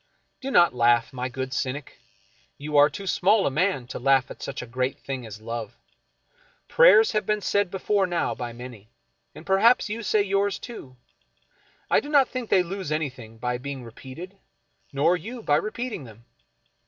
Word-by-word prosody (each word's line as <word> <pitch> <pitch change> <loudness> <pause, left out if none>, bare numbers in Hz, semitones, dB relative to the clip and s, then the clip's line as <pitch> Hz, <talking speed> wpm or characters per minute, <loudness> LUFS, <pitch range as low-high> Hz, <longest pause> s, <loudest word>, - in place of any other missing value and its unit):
Do 270 - -5
not 175 - +5
laugh, 120 +1 +3
my 125 0 -3
good 130 +1 -5
cynic. 140 0 -4 0.6
You 150 +1 -5
are 145 +1 +7
too 200 - -8
small 195 +3 +3
a - - +1
man 165 -3 0
to - - -5
laugh 135 0 +2
at - - -11
such 135 -2 -5
a - - -7
great 130 +2 -2
thing 130 -4 -6
as 105 -1 -9
love. 115 -1 -6 0.9
Prayers 485 -2 +6
have 215 - -1
been 210 0 +1
said 200 -1 +1
before 195 +1 0
now 175 -1 -1
by 120 -1 -5
many, 120 -3 -11 0.5
and 160 - -11
perhaps 215 +5 +4
you 225 +2 -4
say 210 0 +2
yours, 200 0 0
too. 135 - -10 0.9
I - - +4
do 290 - -8
not 280 -4 +4
think 255 -3 -5
they 185 - +4
lose 185 -2 -5
anything 130 -7 -4
by 125 +1 -2
being 135 -1 -6
re 115 - -10
peated, 170 - -10 0.5
nor 155 +5 +3
you 225 +7 -7
by 145 -5 +3
repeating 215 - -4
them. 115 0 -15
150 Hz, 180 wpm, -25 LUFS, 125-200 Hz, 0.9 s, are